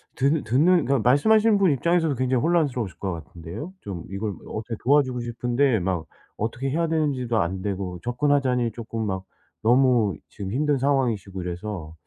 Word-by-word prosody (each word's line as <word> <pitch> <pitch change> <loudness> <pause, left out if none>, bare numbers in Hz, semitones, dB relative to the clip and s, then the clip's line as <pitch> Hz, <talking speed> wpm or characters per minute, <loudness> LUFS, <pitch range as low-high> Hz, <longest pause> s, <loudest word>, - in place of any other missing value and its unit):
듣 140 +4 +1
듣는 155 +8 +3
그니까 135 0 +2
말씀하시는 210 - +4
분 190 -5 +4
입장에서도 165 +1 +1
굉장히 130 0 +1
혼란스러우실 145 - 0
것 95 -1 -2
같은데요. 85 - -8
좀 90 -4 -6
이걸 100 +1 -3
어떻게 110 +1 -5
도와주고 130 -2 +3
싶은데 120 +1 +1
막 90 -3 -2 0.3
어떻게 120 +5 -2
해야 165 +2 +1
되는지도 140 -7 0
안 95 +2 -1
되고 95 -3 -3
접근하자니 125 -1 +1
쪼끔 115 -1 -4
막 95 -1 -3 0.4
너무 120 - +4
지금 95 -1 -6
힘든 145 +1 +1
상황이시고 120 -9 0
이래서 90 -3 -5
120 Hz, 395 characters per minute, -24 LUFS, 100-140 Hz, 0.4 s, 말씀하시는